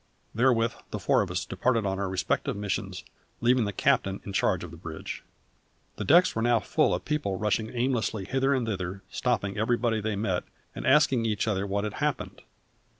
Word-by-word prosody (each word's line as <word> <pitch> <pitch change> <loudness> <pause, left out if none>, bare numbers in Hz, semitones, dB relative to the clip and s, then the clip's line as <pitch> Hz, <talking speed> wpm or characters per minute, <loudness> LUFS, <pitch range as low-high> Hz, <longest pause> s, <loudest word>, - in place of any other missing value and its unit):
Therewith 115 -1 +3 0.2
the - - -4
four - - +2
of - - -2
us - - -2
departed 120 -2 +1
upon 95 0 -1
our 100 -1 -1
respective 95 -4 -1
missions, 100 -2 -3 0.4
leaving 120 -1 +3
the 100 - -2
captain 95 0 +1
in 100 - -6
charge 95 -2 +1
on 85 - -8
the - - -9
bridge. 80 -1 -7 0.7
The - - -3
decks 175 +4 +5
were 110 - 0
now 120 0 +3
full 155 - +2
of - - -6
people 150 -11 -1
rushing 105 +2 0
aimlessly 120 -5 -1
hither 135 +5 +1
and 130 -4 +1
thither, 95 -2 -4
stopping 100 -5 -1
everybody 115 0 +1
they 110 0 -1
met, 95 -3 -1 0.3
and - - -5
asking 130 -4 +4
each 105 0 -1
other 100 -2 0
what 100 +1 -1
had 105 - -3
happened. - - -2
110 Hz, 190 wpm, -27 LUFS, 95-120 Hz, 0.7 s, decks